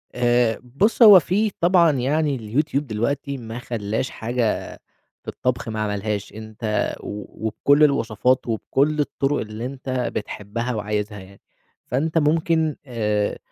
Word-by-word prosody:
آآ، 120 -2 +2
بُص 140 - 0
هو 205 -4 +10
في 200 +6 0
طبعًا 175 -1 +5
يعني 145 +2 0
الYouTube 125 +7 -1
دلوقتي 140 +3 -2
ما 115 -1 -7
خلاش 110 0 -3
حاجة 115 -1 -2 0.5
في - - -31
الطبخ 125 -2 -2
ما 110 -1 -4
عملهاش، 105 -1 -3
أنت 110 0 -3
و 105 +1 -8
وبكل 140 +7 +3
الوصفات 130 -2 +2
وبكل 140 +6 0
الطرق 145 0 0
اللي 110 +2 -5
أنت 135 +1 -7 0.3
بتحبها 115 +4 -4
وعايزها 105 0 -3
يعني. 95 +1 -15 0.5
فأنت 155 +6 0
ممكن 160 0 +2
آآ 105 -5 -1
125 Hz, 130 wpm, -22 LUFS, 110-145 Hz, 0.5 s, هو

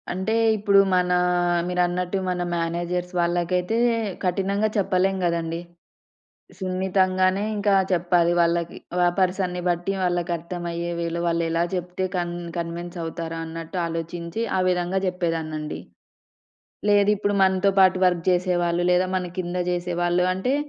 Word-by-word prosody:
అంటే 190 +5 -1 0.2
ఇప్పుడు, 200 -1 +4 0.2
మన 180 0 +2 0.6
మీరన్నట్టు 180 +1 0
మన 180 -1 -1
మేనేజర్స్ 175 +1 -2
వాళ్ళకైతే 175 +4 0 0.5
కఠినంగా 195 +3 0
చెప్పలేం 190 -1 +1
గదండీ. 165 -1 -1 1.0
సున్నితంగానే 185 0 +1
ఇంకా 205 -1 +1 0.2
చెప్పాలి 175 -1 +2
వాళ్ళకి. 170 0 +1 0.3
ఆ - - +5
పర్సన్‌ని 185 -1 0
బట్టి 175 +2 0
వాళ్ళకి 175 -1 0
అర్థమయ్యే 170 0 -4
వేలో 170 0 -2
వాళ్ళేలా 165 0 +1
చెప్తే 180 +1 -3
కన్ 175 -1 -1 0.2
కన్విన్స్ 170 +1 -5
అవుతారు 165 0 -5
అన్నట్టు 165 +2 -7
ఆలోచించి, 170 +4 -4 0.2
ఆ - - +2
విధంగా 180 +1 0
జెప్పేదాన్నండి. 165 -4 -2 1.1
లేదు 205 0 +5
ఇప్పుడు 205 0 -1
మనతో 190 +1 +3
పాటు 185 -1 +5
వర్క్ 175 -2 +1
జెసేవాళ్ళు 175 -1 +1
లేదా, 180 +1 +2
మనకింద 180 0 -4
జెసేవాళ్ళు 175 0 0
అంటే 220 +9 0
180 Hz, 115 wpm, -24 LUFS, 170-185 Hz, 1.1 s, ఆ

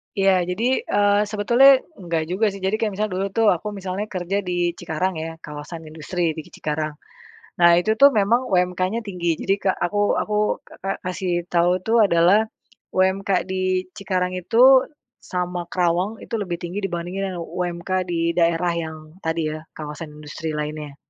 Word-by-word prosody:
Iya, 190 -3 +3
jadi, 235 +8 +1
eee, 205 0 +3
sebetulnya 235 +6 +6 0.2
enggak 170 -3 -1
juga 215 +4 +2
sih 195 -2 -5
jadi 200 +3 0
kayak 215 -2 0
misalnya 210 -1 -2
dulu 195 - 0
tuh 225 -1 +3
aku 180 +4 -2
misalnya 195 +2 -4
kerja 185 0 -2
di 175 -2 0
Cikarang 175 +1 -3
ya 165 +1 -5
kawasan 150 +3 -8
industri 160 +2 -2
di 160 - -7
ki - - -19
Cikarang 155 0 -3 0.6
nah 170 0 +7
itu 180 +5 +2
tuh 280 - +9
memang 220 +4 +3
UMK-nya 185 +4 +1
tinggi 175 -4 -1
jadi 195 - +1
kek 190 - +1
aku 205 +2 +1
aku 210 - -1 0.3
ka - - -15
ka 195 +1 -2
kasih 180 -1 -1
tau 175 +1 +3
itu 225 - -1
adalah 180 0 +5 0.6
UMK 190 +1 +1 0.2
di 185 0 -1
Cikarang 185 -3 -1
itu 245 +8 +5 0.3
sama 180 -1 -3
Karawang 180 +4 0
itu - - -12
lebih 175 -3 -2
tinggi 175 +3 -5
dibandingkan 185 +1 -3
dengan 170 - -4
UMK 175 +1 -4 0.2
di 170 -1 +1
daerah 170 0 +2
yang 160 -1 -4 0.3
tadi 160 -1 -1
ya 155 - -5 0.2
kawasan 150 +1 -7
industri 150 +1 -6
lainnya. 150 -1 -5
180 Hz, 170 wpm, -22 LUFS, 170-200 Hz, 0.6 s, tuh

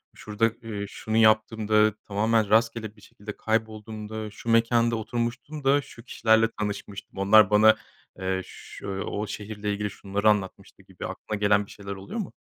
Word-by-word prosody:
"şurada, 110 +1 0
iii, 105 -3 -5
şunu 110 +2 -3
yaptığımda, 110 -1 +4
tamamen 110 +1 +1
rastgele 110 -1 +1
bir 105 - -20
şekilde 105 +1 -10
kaybolduğumda, 110 -1 -3
şu 115 +2 -8
mekânda 115 0 +3
oturmuştum 120 +6 -4
da 140 +1 +4
şu 115 -3 -14
kişilerle 110 -2 +3
tanışmıştım, 100 -1 -5
onlar 105 +1 +6
bana, 110 +1 +6 0.4
eee, 95 0 -1
ş - - -12
o 100 +2 -3
şehirle 105 0 -4
ilgili 105 0 -2
şunları 100 +2 0
anlatmıştı" 100 -3 -2
gibi - - -9
aklına 105 - -5
gelen 105 0 +3
bir - - -15
şeyler 100 -1 -9
oluyor 95 - -6
mu? 195 - -5
110 Hz, 155 wpm, -26 LUFS, 105-115 Hz, 0.4 s, onlar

